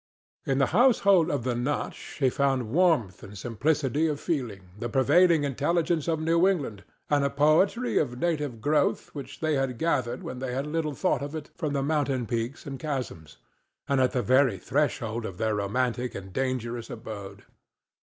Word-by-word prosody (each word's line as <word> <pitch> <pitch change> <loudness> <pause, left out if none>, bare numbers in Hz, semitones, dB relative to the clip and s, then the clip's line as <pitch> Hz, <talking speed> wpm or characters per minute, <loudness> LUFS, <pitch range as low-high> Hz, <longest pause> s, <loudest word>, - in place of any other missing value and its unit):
In 135 - +1
the 140 - +4
household 200 -8 +5
of 140 -5 -1
the 125 0 0
Notch 125 +5 -3
he 130 -3 +3
found 135 -5 0
warmth 155 - +2
and 100 +1 -10
simplicity 140 +7 0
of 150 -2 -2
feeling, 110 - -3
the 120 - -3
pervading 155 +6 +4
intelligence 155 +4 0
of 160 -2 +1
New 165 +3 +3
England, 140 - -1 0.3
and 145 -1 +3
a 140 - +2
poetry 155 - +3
of 125 -5 -2
native 145 -7 -2
growth 150 +4 +1
which 135 -1 -8
they 155 -1 +1
had 135 -3 -1
gathered 130 -5 -1
when 125 - -6
they 130 0 -3
little 150 +1 -2
thought 185 - 0
of 145 +2 -5
it 155 -2 -7
from 150 -2 -2
the 140 -1 0
mountain 140 -4 0
peaks 120 +6 -3
and 135 -2 -6
chasms, 125 - -5 0.5
and 140 -1 +2
at 130 - +3
the 125 - 0
very 130 -4 +3
threshold 120 -2 -1
of 95 -4 -6
their 110 +1 0
romantic 120 +4 -1
and 95 -1 -8
dangerous 120 -2 -2
abode. 100 -4 -8
135 Hz, 170 wpm, -27 LUFS, 120-155 Hz, 0.5 s, household